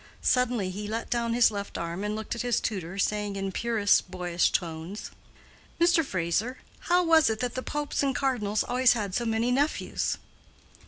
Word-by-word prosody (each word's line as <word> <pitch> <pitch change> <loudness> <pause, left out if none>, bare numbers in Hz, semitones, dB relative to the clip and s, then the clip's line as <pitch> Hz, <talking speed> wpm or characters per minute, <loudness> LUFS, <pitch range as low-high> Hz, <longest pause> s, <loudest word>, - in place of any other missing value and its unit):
Suddenly 245 -7 +2
he 205 +2 -5
let 225 +2 -4
down 235 -1 0
his 240 -2 +5
left 200 -1 -5
arm 170 +3 -4
and 210 +1 -2
looked 220 0 -4
at 235 - -3
his 245 -2 +1
tutor, 190 -3 -4
saying 210 0 0
in 195 0 -3
purest 210 -2 +2
boyish 180 -2 0
tones, 170 +3 -3 0.7
"Mr. 340 -1 +4
Fraser, 200 - -1 0.3
how 355 +1 +5
was 325 -5 +5
it 220 -1 -2
that 250 -1 -2
the 255 - -3
popes 295 +2 -2
and 275 -1 0
cardinals 215 -7 0
always 250 0 +4
had 205 -5 -3
so 235 - 0
many 225 +2 +1
nephews?" 285 +4 0
220 Hz, 175 wpm, -27 LUFS, 195-250 Hz, 0.7 s, his